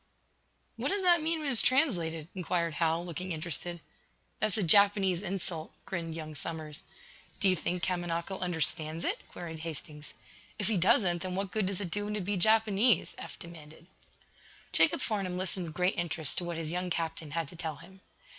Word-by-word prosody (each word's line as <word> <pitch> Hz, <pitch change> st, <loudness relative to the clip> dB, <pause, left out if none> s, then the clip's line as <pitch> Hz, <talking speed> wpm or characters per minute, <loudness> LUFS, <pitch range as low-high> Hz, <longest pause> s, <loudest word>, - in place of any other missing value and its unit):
"What -, -, -1 dB
does 395 Hz, 0 st, 0 dB
that 350 Hz, -2 st, +5 dB
mean 320 Hz, 0 st, 0 dB
when 290 Hz, -2 st, 0 dB
it's 240 Hz, -, +5 dB
translated?" 175 Hz, -, +2 dB
inquired 175 Hz, -3 st, -1 dB
Hal, 165 Hz, +2 st, +1 dB
looking 180 Hz, +2 st, -5 dB
interested. 170 Hz, +1 st, -4 dB, 0.6 s
"That's 215 Hz, -2 st, +2 dB
a 210 Hz, -, +1 dB
Japanese 195 Hz, 0 st, +5 dB
insult," 185 Hz, -4 st, -3 dB
grinned 165 Hz, -4 st, -4 dB
young 155 Hz, -1 st, -6 dB
Somers. 155 Hz, 0 st, -4 dB, 0.6 s
"Do 200 Hz, -, +3 dB
you 185 Hz, -, +4 dB
think 180 Hz, +2 st, -3 dB
Kamanako 175 Hz, 0 st, -2 dB
understands 160 Hz, -2 st, 0 dB
it?" -, -, +1 dB
queried 165 Hz, -2 st, -7 dB
Hastings. 150 Hz, -2 st, -8 dB, 0.4 s
"If 205 Hz, -, -2 dB
he 215 Hz, -, +2 dB
doesn't 180 Hz, -2 st, +4 dB
then 185 Hz, -1 st, -3 dB
what 195 Hz, -1 st, -2 dB
good 215 Hz, -4 st, 0 dB
does 195 Hz, 0 st, -2 dB
it 180 Hz, -4 st, -4 dB
do 205 Hz, +2 st, -1 dB
him 210 Hz, -, -2 dB
to 210 Hz, -, -1 dB
be 200 Hz, +3 st, -1 dB
Japanese?" 215 Hz, +1 st, +4 dB
Eph -, -, -8 dB
demanded. 160 Hz, -1 st, -11 dB, 0.9 s
Jacob -, -, +4 dB
Farnum 195 Hz, -5 st, -1 dB
listened 185 Hz, -1 st, 0 dB
with 155 Hz, -, -9 dB
great 180 Hz, +1 st, +1 dB
interest 165 Hz, -3 st, -1 dB
to 175 Hz, -, -5 dB
what 170 Hz, -1 st, -3 dB
his 160 Hz, -1 st, -3 dB
young 180 Hz, +1 st, -2 dB
captain 165 Hz, -2 st, -3 dB
had 165 Hz, -3 st, 0 dB
to -, -, -11 dB
tell 160 Hz, -2 st, -4 dB
him. 185 Hz, +5 st, -15 dB
175 Hz, 185 wpm, -31 LUFS, 165-195 Hz, 0.9 s, that